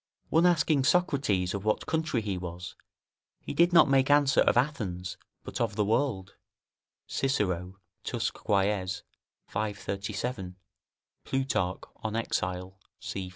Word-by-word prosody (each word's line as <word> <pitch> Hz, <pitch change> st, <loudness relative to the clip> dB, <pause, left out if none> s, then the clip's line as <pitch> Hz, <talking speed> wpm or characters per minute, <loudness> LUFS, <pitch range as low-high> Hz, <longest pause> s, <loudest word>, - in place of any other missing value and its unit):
One 165 Hz, +2 st, +5 dB
asking 155 Hz, -5 st, +3 dB
Socrates 140 Hz, -, +2 dB
of 100 Hz, -1 st, -3 dB
what 110 Hz, 0 st, 0 dB
country 160 Hz, -7 st, 0 dB
he 100 Hz, -2 st, -2 dB
was, 90 Hz, 0 st, -6 dB, 0.6 s
he -, -, -6 dB
did 170 Hz, +1 st, +4 dB
not 165 Hz, -3 st, +7 dB
make 135 Hz, 0 st, +3 dB
answer, 145 Hz, -2 st, +5 dB
of -, -, +3 dB
Athens, 95 Hz, -10 st, -1 dB, 0.3 s
but -, -, -5 dB
of 110 Hz, -4 st, 0 dB
the 105 Hz, -1 st, +1 dB
world; 110 Hz, -4 st, 0 dB, 0.7 s
[Cicero, 95 Hz, -8 st, -1 dB, 0.3 s
Tusc. -, -, -2 dB
Quaes., 95 Hz, -3 st, 0 dB, 0.4 s
v. 105 Hz, -1 st, -2 dB
37; 100 Hz, 0 st, -4 dB, 0.7 s
Plutarch, 130 Hz, -9 st, -1 dB
On 110 Hz, 0 st, -4 dB
Exile, 95 Hz, -4 st, -2 dB, 0.2 s
c. 95 Hz, -1 st, -5 dB
105 Hz, 125 wpm, -29 LUFS, 95-135 Hz, 0.7 s, not